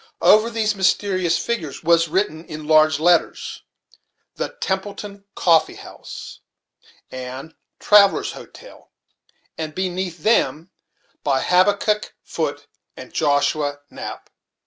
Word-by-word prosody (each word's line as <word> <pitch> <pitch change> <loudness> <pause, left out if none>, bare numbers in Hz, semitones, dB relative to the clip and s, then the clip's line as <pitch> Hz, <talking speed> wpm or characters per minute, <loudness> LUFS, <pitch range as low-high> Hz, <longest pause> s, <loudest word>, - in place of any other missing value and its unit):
Over 215 +2 +6
these 220 -2 0
mysterious 185 -2 +1
figures 170 - -4
was 165 0 +4
written, 165 -1 -1
in 155 0 -8
large 155 -1 +4
letters, 175 +1 +1 0.7
"The - - -3
Templeton 200 +1 -4
Coffee 165 -3 +3
house, - - -10 0.7
and 130 +4 -7 0.3
Traveller's 205 -1 +4
Hotel," - - -14 0.7
and 155 -1 -5
beneath 185 -3 -3
them, 185 -6 +1 0.5
"By 135 -2 +1
Habakkuk 205 +3 +2
Foote - - -4 0.3
and - - -11
Joshua 145 -1 0
Knapp." - - -8
175 Hz, 100 wpm, -21 LUFS, 155-200 Hz, 0.7 s, Over